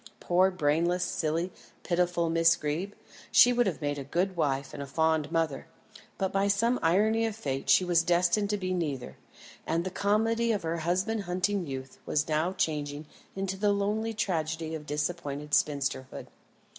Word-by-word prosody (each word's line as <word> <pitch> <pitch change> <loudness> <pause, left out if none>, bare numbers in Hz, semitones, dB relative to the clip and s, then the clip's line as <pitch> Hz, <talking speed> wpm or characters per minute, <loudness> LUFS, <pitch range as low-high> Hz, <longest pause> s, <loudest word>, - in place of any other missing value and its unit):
Poor 185 +2 +3
brainless, 175 +1 +1
silly, 165 0 -1 0.3
pitiful 175 -1 +1
Miss 165 0 +4
Greeb; 160 +6 -3 0.4
she 245 - +7
would 240 -2 +2
have 170 -4 -3
made 145 0 -1
a - - -4
good 180 +7 -1
wife 140 -4 -1
and - - -6
a 140 - -5
fond 160 +1 +1
mother, 165 -4 -1 0.5
but 190 0 -1
by 195 +1 +2
some 230 +5 +2
irony 215 +7 +3
of 220 - -4
fate 135 -10 -4
she 185 - +5
was 175 -1 +3
destined 175 +4 +2
to 210 - 0
be 185 -2 -2
neither; 145 -8 -3 0.5
and 165 +1 0
the 185 - -4
comedy 225 +4 +1
of 210 -5 -1
her 165 +1 -2
husband 185 +6 -1
hunting 185 0 -1
youth 130 -1 -7
was 150 - 0
now 160 +3 +1
changing 150 -4 -2 0.3
into 195 0 -3
the 205 +1 +2
lonely 210 +3 0
tragedy 160 -4 -2
of 150 -2 -6
disappointed 150 -1 -3
spinsterhood. 140 -3 0
170 Hz, 170 wpm, -29 LUFS, 150-195 Hz, 0.5 s, she